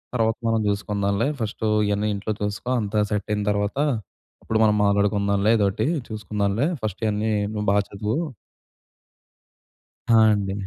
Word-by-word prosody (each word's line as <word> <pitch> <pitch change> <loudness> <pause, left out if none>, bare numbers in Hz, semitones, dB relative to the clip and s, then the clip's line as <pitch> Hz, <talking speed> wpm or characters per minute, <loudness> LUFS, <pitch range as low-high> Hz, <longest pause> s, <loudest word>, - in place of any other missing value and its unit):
తర్వాత 115 -2 +1
మనం 115 -1 +2
చూసుకుందాంలే 100 +2 0
ఫస్ట్ 110 0 -3 0.2
ఇయన్నీ 105 +1 0
ఇంట్లో 100 +2 -3
చూసుకో. 105 +4 -3
అంతా 105 0 -1
సెట్ 105 -2 -1
అయిన 105 0 0
తర్వాత 105 +3 -1 0.7
అప్పుడు 110 - 0
మనం 105 -1 +4
మాట్లాడుకుందాంలే 100 0 +2
ఎదోటి 105 +1 +1 0.2
చూసుకుందాంలే 105 +1 -1 0.2
ఫస్ట్ 105 -2 -4
ఇయన్నీ 105 +1 0 0.2
నువ్వు 105 -1 -2
బా 100 - +3
చదువు. 105 +3 -3 1.9
ఆ! - - +5 0.2
అండి. 100 -2 -1
105 Hz, 130 wpm, -23 LUFS, 100-110 Hz, 1.9 s, ఆ